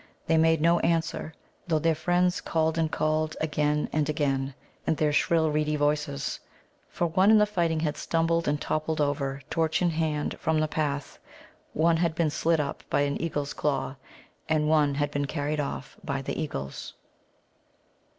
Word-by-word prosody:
They 165 Hz, -, +2 dB
made 160 Hz, -1 st, +4 dB
no 170 Hz, +2 st, +4 dB
answer, 165 Hz, -1 st, 0 dB, 0.4 s
though 160 Hz, -3 st, +2 dB
their 165 Hz, +1 st, +2 dB
friends 175 Hz, +3 st, +1 dB
called 160 Hz, -1 st, 0 dB
and 160 Hz, -1 st, +1 dB
called, 155 Hz, 0 st, 0 dB
again 150 Hz, -1 st, 0 dB
and 155 Hz, -1 st, +1 dB
again, 135 Hz, -3 st, -1 dB, 0.3 s
in -, -, +3 dB
their 150 Hz, -1 st, +1 dB
shrill 160 Hz, +1 st, +2 dB
reedy 150 Hz, 0 st, 0 dB
voices. 145 Hz, -1 st, -1 dB, 0.5 s
For 175 Hz, -, -1 dB
one 185 Hz, +4 st, +3 dB
in 215 Hz, -1 st, +6 dB
fighting 170 Hz, -6 st, 0 dB
had 150 Hz, -2 st, -1 dB
stumbled 165 Hz, 0 st, 0 dB
and 145 Hz, 0 st, +1 dB
toppled 155 Hz, +1 st, -2 dB
over, 140 Hz, -2 st, -1 dB
torch 160 Hz, -1 st, +1 dB
in 175 Hz, -1 st, +2 dB
hand, 155 Hz, -2 st, -1 dB
from 160 Hz, -1 st, +1 dB
the 155 Hz, -, +1 dB
path, 145 Hz, -2 st, -3 dB, 0.5 s
one 165 Hz, +1 st, +3 dB
had 165 Hz, -1 st, 0 dB
been 160 Hz, -2 st, +1 dB
slit 160 Hz, +1 st, +1 dB
up 145 Hz, -1 st, -3 dB
by -, -, +2 dB
an 140 Hz, 0 st, -1 dB
eagle's 145 Hz, -3 st, -2 dB
claw, 135 Hz, -2 st, -1 dB, 0.5 s
and 155 Hz, -1 st, +2 dB
one 150 Hz, -2 st, +3 dB
had 145 Hz, 0 st, 0 dB
been 145 Hz, -1 st, -1 dB
carried 150 Hz, 0 st, -2 dB
off 140 Hz, -1 st, -4 dB
by 140 Hz, -1 st, -3 dB
the 150 Hz, -, -3 dB
eagles. 70 Hz, -, -5 dB
155 Hz, 170 wpm, -27 LUFS, 145-165 Hz, 0.5 s, in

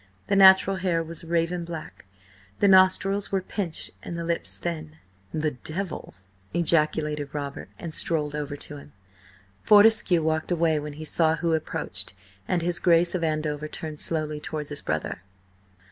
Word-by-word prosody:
The -, -, 0 dB
natural 190 Hz, 0 st, +7 dB
hair 180 Hz, -3 st, 0 dB
was 165 Hz, 0 st, -7 dB
raven 170 Hz, +1 st, -1 dB
black, 165 Hz, -9 st, -8 dB, 0.5 s
the 200 Hz, -, +3 dB
nostrils 190 Hz, +1 st, +4 dB
were 195 Hz, -, +2 dB
pinched 185 Hz, -3 st, -4 dB
and 170 Hz, -, -6 dB
the 170 Hz, -, -3 dB
lips 170 Hz, 0 st, 0 dB
thin. 160 Hz, -2 st, -5 dB, 0.3 s
"The 155 Hz, -1 st, -1 dB
Devil!" 160 Hz, -, -5 dB, 0.4 s
ejaculated 150 Hz, -3 st, +1 dB
Robert, 140 Hz, -2 st, -5 dB
and 165 Hz, -2 st, -7 dB
strolled 150 Hz, -3 st, +1 dB
over 145 Hz, -1 st, -4 dB
to 145 Hz, +1 st, -5 dB
him. 145 Hz, -, -14 dB, 0.7 s
Fortescue 210 Hz, -5 st, +5 dB
walked 160 Hz, 0 st, -1 dB
away 165 Hz, -3 st, +2 dB
when 150 Hz, 0 st, -6 dB
he 155 Hz, +2 st, -8 dB
saw 160 Hz, 0 st, +2 dB
who 165 Hz, 0 st, 0 dB
approached, 155 Hz, -, -3 dB, 0.3 s
and 175 Hz, -2 st, 0 dB
his 175 Hz, 0 st, 0 dB
Grace 170 Hz, -1 st, +3 dB
of 180 Hz, -2 st, -2 dB
Andover 155 Hz, -1 st, -1 dB
turned 155 Hz, -1 st, -6 dB
slowly 155 Hz, -2 st, -2 dB
towards 150 Hz, -1 st, -5 dB
his 145 Hz, -, -4 dB
brother. -, -, -3 dB
165 Hz, 155 wpm, -25 LUFS, 150-175 Hz, 0.7 s, natural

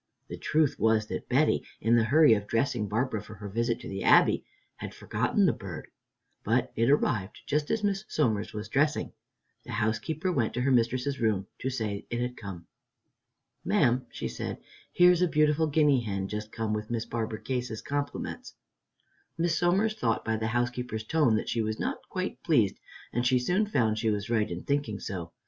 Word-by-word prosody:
The -, -, -6 dB
truth 150 Hz, -2 st, +1 dB
was 110 Hz, 0 st, +3 dB
that -, -, -5 dB
Betty, -, -, +3 dB, 0.2 s
in 115 Hz, +2 st, +3 dB
the 115 Hz, -1 st, +4 dB
hurry 150 Hz, +2 st, +6 dB
of 105 Hz, -1 st, -1 dB
dressing 115 Hz, -2 st, 0 dB
Barbara 110 Hz, +1 st, -1 dB
for 105 Hz, +1 st, -11 dB
her 105 Hz, 0 st, -8 dB
visit 115 Hz, +3 st, -1 dB
to -, -, -8 dB
the 95 Hz, 0 st, -5 dB
Abbey, -, -, +5 dB, 0.3 s
had -, -, -7 dB
forgotten -, -, +1 dB
the -, -, +3 dB
bird, -, -, -8 dB, 0.5 s
but -, -, +1 dB
it 115 Hz, +2 st, +2 dB
arrived 110 Hz, -8 st, +1 dB
just 150 Hz, 0 st, 0 dB
as 220 Hz, -, 0 dB
Miss 200 Hz, 0 st, 0 dB
Somers 110 Hz, -8 st, 0 dB
was 105 Hz, 0 st, -6 dB
dressing. 145 Hz, +6 st, +1 dB, 0.5 s
The -, -, -8 dB
housekeeper 140 Hz, -, -1 dB
went 120 Hz, -10 st, 0 dB
to 125 Hz, -, 0 dB
her 135 Hz, +2 st, +2 dB
mistress's 130 Hz, +3 st, +1 dB
room 105 Hz, -4 st, +1 dB
to 130 Hz, -, -2 dB
say 110 Hz, -6 st, -3 dB
it 120 Hz, -, -2 dB
had 125 Hz, 0 st, -2 dB
come. 95 Hz, -7 st, -8 dB, 1.0 s
"Ma'am," 125 Hz, +2 st, +2 dB
she -, -, -5 dB
said, -, -, -5 dB, 0.3 s
"here's 180 Hz, 0 st, +5 dB
a 180 Hz, -, +4 dB
beautiful 155 Hz, 0 st, +2 dB
guinea 145 Hz, -3 st, +3 dB
hen 100 Hz, -4 st, -3 dB
just 105 Hz, +1 st, -5 dB
come 110 Hz, -2 st, -2 dB
with 105 Hz, 0 st, -3 dB
Miss 115 Hz, -1 st, -2 dB
Barbara 110 Hz, -2 st, -3 dB
Case's 125 Hz, -4 st, -3 dB
compliments." 145 Hz, 0 st, -4 dB, 0.8 s
Miss 170 Hz, 0 st, +1 dB
Somers 190 Hz, +6 st, +2 dB
thought 115 Hz, -, -1 dB
by 110 Hz, -, 0 dB
the 110 Hz, 0 st, -2 dB
housekeeper's 120 Hz, -1 st, -2 dB
tone 145 Hz, -2 st, +2 dB
that 110 Hz, -, -2 dB
she 115 Hz, -, 0 dB
was 110 Hz, 0 st, -2 dB
not -, -, -4 dB
quite -, -, -4 dB
pleased, -, -, +2 dB, 0.3 s
and 120 Hz, -, 0 dB
she 125 Hz, +1 st, +3 dB
soon 180 Hz, +12 st, +1 dB
found 115 Hz, -, +1 dB
she 110 Hz, 0 st, +1 dB
was 105 Hz, +1 st, -2 dB
right 110 Hz, -2 st, +2 dB
in 85 Hz, 0 st, -5 dB
thinking 140 Hz, -8 st, -1 dB
so. 85 Hz, -5 st, -5 dB
120 Hz, 190 wpm, -28 LUFS, 110-145 Hz, 1.0 s, hurry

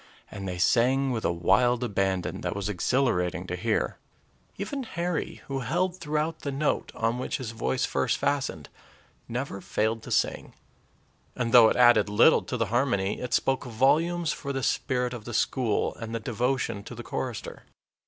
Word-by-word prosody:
And 100 Hz, -2 st, -6 dB
they 90 Hz, -1 st, -4 dB
sang 130 Hz, +7 st, +3 dB
with 115 Hz, -3 st, -2 dB
a -, -, +2 dB
wild 105 Hz, +9 st, +2 dB
abandon 95 Hz, -5 st, -1 dB
that -, -, -3 dB
was 100 Hz, -1 st, -3 dB
exhilarating 100 Hz, -2 st, 0 dB
to -, -, -4 dB
hear. -, -, -1 dB, 0.6 s
Even 270 Hz, +8 st, -4 dB
Harry, 175 Hz, -, -3 dB
who 135 Hz, -1 st, -3 dB
held 175 Hz, +8 st, -1 dB
throughout 155 Hz, 0 st, -2 dB
the 140 Hz, -, -4 dB
note 145 Hz, +2 st, -1 dB
on 115 Hz, +2 st, 0 dB
which 130 Hz, -, -2 dB
his 120 Hz, -4 st, -5 dB
voice 110 Hz, -, -1 dB
first -, -, 0 dB
fastened, 135 Hz, -, -1 dB, 0.6 s
never 120 Hz, -4 st, -4 dB
failed 110 Hz, +4 st, -1 dB
to -, -, -10 dB
sing; -, -, -1 dB, 0.8 s
and, 120 Hz, -2 st, -1 dB
though 120 Hz, -2 st, +8 dB
it -, -, 0 dB
added 120 Hz, -4 st, +5 dB
little 110 Hz, +10 st, +5 dB
to 125 Hz, -, -4 dB
the 115 Hz, -, +1 dB
harmony, 105 Hz, -6 st, +1 dB
it 125 Hz, -, -4 dB
spoke 135 Hz, -1 st, 0 dB
volumes 155 Hz, +8 st, +2 dB
for 140 Hz, -, -5 dB
the 135 Hz, -1 st, -3 dB
spirit 125 Hz, -2 st, 0 dB
of 115 Hz, -3 st, -8 dB
the 120 Hz, -, -5 dB
school 115 Hz, -3 st, +1 dB
and 115 Hz, 0 st, -5 dB
the -, -, -1 dB
devotion 120 Hz, -1 st, -1 dB
to 120 Hz, -, -8 dB
the 120 Hz, -, -7 dB
chorister. 115 Hz, 0 st, -5 dB
120 Hz, 175 wpm, -27 LUFS, 110-135 Hz, 0.8 s, though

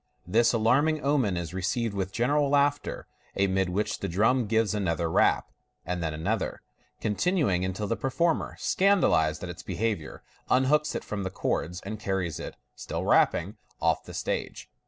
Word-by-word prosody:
This 115 Hz, +6 st, +3 dB
alarming 135 Hz, +7 st, +2 dB
omen 135 Hz, -10 st, +2 dB
is 85 Hz, -1 st, -4 dB
received 100 Hz, +4 st, -1 dB
with 95 Hz, -1 st, -2 dB
general 140 Hz, +6 st, +1 dB
laughter, 145 Hz, 0 st, +1 dB, 0.3 s
amid 95 Hz, -1 st, +1 dB
which 100 Hz, +4 st, -1 dB
the 100 Hz, -, -3 dB
drum 110 Hz, +7 st, +2 dB
gives 110 Hz, -2 st, +2 dB
another 85 Hz, -5 st, 0 dB
rap, -, -, +2 dB, 0.3 s
and 90 Hz, -1 st, -2 dB
then 80 Hz, -2 st, -1 dB
another, 95 Hz, +8 st, -2 dB, 0.4 s
continuing 110 Hz, -, +1 dB
until 95 Hz, +3 st, -2 dB
the 115 Hz, -, -1 dB
performer, 160 Hz, +7 st, 0 dB
scandalized 130 Hz, -, +2 dB
at 90 Hz, -, -5 dB
its 85 Hz, -, -10 dB
behaviour, 105 Hz, -8 st, -3 dB, 0.3 s
unhooks 150 Hz, +4 st, +3 dB
it -, -, -3 dB
from 105 Hz, -1 st, -4 dB
the 95 Hz, -, -2 dB
cords, 90 Hz, -1 st, -2 dB
and 110 Hz, +2 st, -6 dB
carries 95 Hz, -6 st, -2 dB
it, -, -, -7 dB, 0.2 s
still -, -, -4 dB
rapping, 100 Hz, +6 st, +2 dB, 0.2 s
off -, -, +1 dB
the -, -, -10 dB
stage. -, -, -4 dB
105 Hz, 155 wpm, -27 LUFS, 90-130 Hz, 0.4 s, This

